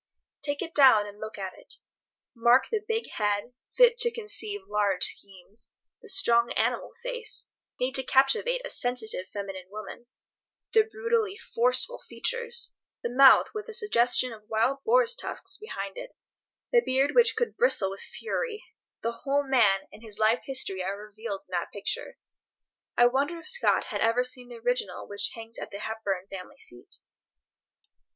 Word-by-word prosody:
Take 285 +1 -1
it 330 -2 -8
down 255 -7 +7
and 205 0 -11
look 215 0 -7
at 190 -2 -5
it. - - -2 0.6
Mark 240 +2 +4
the 435 -2 -1
big 450 0 -1
head, 205 +3 -1 0.2
fit - - +6
to 480 - +4
conceive 425 -2 -4
large 205 - +1
schemes; 195 +3 -2 0.3
the 445 - -14
strong 235 -12 +3
animal - - 0
face, 480 -3 -4 0.3
made 255 +1 0
to 265 - +4
captivate 275 - +2
a - - -5
sensitive, 230 -6 -1
feminine 195 -3 -7
woman; 215 +3 -9 0.7
the 440 -1 +6
brutally 460 -4 0
forceful - - 0
features—the 475 - -3
mouth 265 +1 +7
with 425 0 -5
a 445 - -3
suggestion 250 - +2
of 215 -1 -15
wild 245 +5 +1
boars' 480 0 +4
tusks 390 -5 -3
behind 195 - -6
it, - - -10 0.6
the 480 - +6
beard 270 - +1
which 485 -1 +5
could 475 - -1
bristle 340 - +3
with 195 - -8
fury: 460 0 -4 0.4
the 230 - 0
whole 285 +1 +1
man 215 -8 +4
and - - -13
his 220 -3 -6
life 220 +2 +2
history 195 -9 -1
are 195 +2 -3
revealed 210 -1 -7
in - - -25
that 175 -1 -2
picture. 200 0 -3 0.8
I 240 - +7
wonder 280 +7 +1
if 335 - -8
Scott 485 +1 +5
had - - -3
ever 230 +2 +3
seen 250 -1 -4
the 240 - -9
original 235 -5 -2
which 205 0 -1
hangs 225 0 -9
at - - -6
the 200 - -7
Hepburn 205 -3 -3
family 195 +9 -9
seat? 120 - -5
250 Hz, 160 wpm, -28 LUFS, -, 0.8 s, down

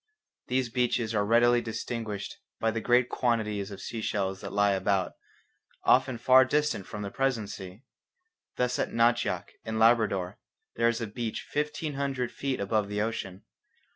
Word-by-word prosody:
These 130 -1 0
beaches 120 -2 0
are 105 -2 +2
readily 120 +3 +4
distinguished 110 -2 -5 0.2
by 115 - +1
the 115 0 -3
great 125 +1 +3
quantities 110 -6 -1
of 100 -1 -8
sea 115 - -5
shells 95 -3 -2
that 100 -3 -6
lie 100 0 +3
about, 95 0 +1 0.7
often 130 -1 +3
far 130 +2 +6
distant 145 -7 0
from 105 -1 -6
the 100 - -5
present 125 -6 -1
sea. 95 +4 -9 0.7
Thus 125 0 0
at - - 0
Nachvak 115 +1 +1
in 110 0 -3
Labrador 110 -5 +3 0.4
there 115 0 +3
is 115 0 -2
a - - -1
beach 110 +1 -4
fifteen 150 +1 -2
hundred 135 -3 -2
feet 135 -2 -3
above 100 0 0
the 105 0 -2
ocean. 100 -3 -3
115 Hz, 160 wpm, -28 LUFS, 105-125 Hz, 0.7 s, far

